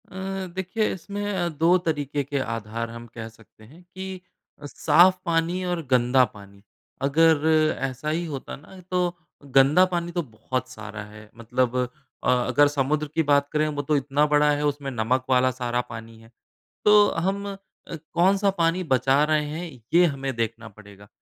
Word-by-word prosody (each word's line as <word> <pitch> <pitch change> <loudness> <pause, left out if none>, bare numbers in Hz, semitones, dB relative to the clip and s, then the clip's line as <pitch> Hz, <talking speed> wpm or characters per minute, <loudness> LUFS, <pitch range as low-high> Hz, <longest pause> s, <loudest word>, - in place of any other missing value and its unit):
अ, 190 0 -5
देखिए 190 +4 -1
इसमें 200 +3 -6
अ, 175 -2 -1
2 165 +3 +3
तरीक़े 145 -4 -2
के 140 0 -3
आधार 115 -1 -4
हम 115 +1 -9
कह 115 -2 -6
सकते 110 -1 -21
हैं 155 +11 -17
कि 190 -1 -6 0.5
साफ़ 175 +6 +4
पानी 170 +2 0
और 175 -1 -2
गंदा 125 +1 +4
पानी 100 -1 -15 0.4
अगर 155 +2 +3 0.3
ऐसा 135 +2 -3
ही 165 +3 -1
होता 140 -5 -6
ना 185 +6 -15
तो 180 -1 0 0.4
गंदा 140 +7 +6
पानी 175 0 -2
तो 175 0 -1
बहुत 125 +1 -5
सारा 110 -3 -8
है। 105 0 -13
मतलब 125 +2 -1 0.5
अ, - - +1 0.2
अगर 145 0 +4
समुद्र 145 +2 0
की 165 - +2
बात 140 -1 +3
करें 155 0 +2
वो 145 -1 -2
तो 150 +2 0
इतना 145 +2 +1
बड़ा 150 0 +4
है 145 0 0
उसमें 140 -1 -2
नमक 125 +2 0
वाला 130 0 +3
सारा 125 -1 -2
पानी 115 -1 -9
है। 115 0 -18 0.5
तो 210 -1 +6
हम 195 +4 -2
अ, - - -8 0.6
कौन-सा 195 +3 +3
पानी 165 +2 +2
बचा 135 +3 +3
रहे 155 0 +1
हैं 165 +3 -5 0.2
ये 175 +1 +7
हमें 135 -4 -1
देखना 115 0 -3
पड़ेगा। 100 -1 -16
145 Hz, 170 wpm, -24 LUFS, 120-170 Hz, 0.6 s, ये